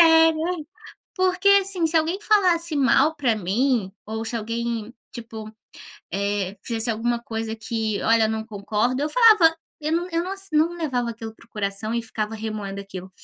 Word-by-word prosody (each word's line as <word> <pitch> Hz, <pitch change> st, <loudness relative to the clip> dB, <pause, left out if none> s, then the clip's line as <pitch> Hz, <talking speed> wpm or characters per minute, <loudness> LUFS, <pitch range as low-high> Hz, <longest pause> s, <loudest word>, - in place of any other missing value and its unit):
sério, 325 Hz, -1 st, +6 dB
hein. 310 Hz, -4 st, -6 dB, 0.5 s
Porque, 370 Hz, +1 st, +1 dB
assim, 380 Hz, -3 st, +2 dB
se 330 Hz, -, -2 dB
alguém 330 Hz, +5 st, 0 dB
falasse 350 Hz, -7 st, +2 dB
mal 285 Hz, +3 st, +3 dB
para 250 Hz, -7 st, +1 dB
mim, 215 Hz, +2 st, 0 dB
ou 220 Hz, +1 st, -4 dB
se 235 Hz, -, -2 dB
alguém, 230 Hz, 0 st, -3 dB, 0.2 s
tipo, 225 Hz, -2 st, -8 dB, 0.6 s
eh, 200 Hz, 0 st, -2 dB
fizesse 230 Hz, 0 st, 0 dB
alguma 235 Hz, +2 st, -1 dB
coisa 225 Hz, -1 st, -4 dB
que: 220 Hz, -2 st, -2 dB
"Olha, 225 Hz, 0 st, +4 dB
eu -, -, +1 dB
não 220 Hz, 0 st, -3 dB
concordo." 215 Hz, +4 st, -1 dB
Eu 300 Hz, -, 0 dB
falava, 425 Hz, -9 st, +6 dB, 0.3 s
eu 305 Hz, +1 st, -2 dB
não 345 Hz, +2 st, 0 dB
eu 335 Hz, +1 st, 0 dB
não 385 Hz, +1 st, -4 dB
se 390 Hz, 0 st, +2 dB
eu 300 Hz, -, +4 dB
não 315 Hz, -, +4 dB
não 345 Hz, -, -9 dB
levava 250 Hz, -8 st, -1 dB
aquilo 225 Hz, -1 st, -8 dB
para 230 Hz, -, -20 dB
o -, -, -40 dB
coração 210 Hz, +1 st, -2 dB
e 235 Hz, -, -1 dB
ficava 220 Hz, -1 st, -4 dB
remoendo 210 Hz, -3 st, -5 dB
aquilo. 190 Hz, -1 st, -9 dB
235 Hz, 190 wpm, -23 LUFS, 220-325 Hz, 0.6 s, sério